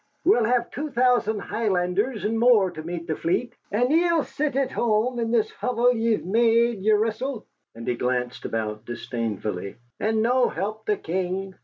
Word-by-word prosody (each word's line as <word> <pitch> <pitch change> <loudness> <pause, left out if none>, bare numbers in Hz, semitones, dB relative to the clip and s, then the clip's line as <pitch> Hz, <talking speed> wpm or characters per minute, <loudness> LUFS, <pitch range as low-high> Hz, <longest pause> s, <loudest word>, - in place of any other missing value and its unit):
"We'll 245 - +4
have 240 +1 +1
two 300 +3 -4
thousand 245 -5 +2
Highlanders 205 +1 -1
and 225 +1 0
more 225 -6 +5
to 155 - -7
meet 170 +1 -5
the 160 -2 -2
fleet. 175 +11 -1 0.2
And 245 +5 +1
ye'll 335 -1 +3
sit 295 -3 -3
at 275 -1 +1
hame, 235 +2 +1
in 230 -1 -1
this 230 -2 +1
hovel 245 0 +1
ye've 225 -4 0
made 230 +2 +3
yeresel" 220 +4 0 0.3
(and 115 0 -9
he 125 - +2
glanced 125 0 -2
about 110 -1 -3
disdainfully) 110 -5 -4 0.2
"and 220 0 +1
no 245 +1 +3
help 215 +2 -4
the 210 - +2
King?" 190 +3 -3
220 Hz, 165 wpm, -24 LUFS, 180-240 Hz, 0.3 s, more